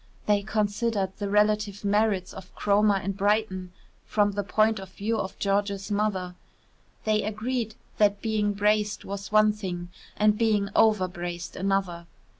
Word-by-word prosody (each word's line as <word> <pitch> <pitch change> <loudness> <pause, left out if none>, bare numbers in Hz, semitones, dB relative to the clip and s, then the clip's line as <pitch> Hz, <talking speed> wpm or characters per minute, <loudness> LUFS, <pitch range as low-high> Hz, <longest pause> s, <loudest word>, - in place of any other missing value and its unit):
They 205 -1 +3
considered 210 -1 -1
the 205 -1 -3
relative 210 0 +1
merits 200 -2 +1
of 185 -1 -12
Cromer 205 0 +3
and 195 0 -2
Brighton 200 -2 0 0.3
from 205 -1 +1
the 205 0 -2
point 215 +3 +2
of 190 -1 -9
view 220 +4 -2
of 190 -2 -4
George's 200 0 -1
mother; 200 -3 -1 0.7
they 215 -1 +2
agreed 220 +2 -3 0.2
that 205 -1 +3
being 210 -1 0
braced 210 0 +1
was 200 +1 -6
one 215 0 +5
thing 180 -4 -5 0.3
and 210 0 +3
being 210 -3 +2
overbraced 175 -5 +1
another. 190 -3 -1
205 Hz, 140 wpm, -26 LUFS, 195-215 Hz, 0.7 s, one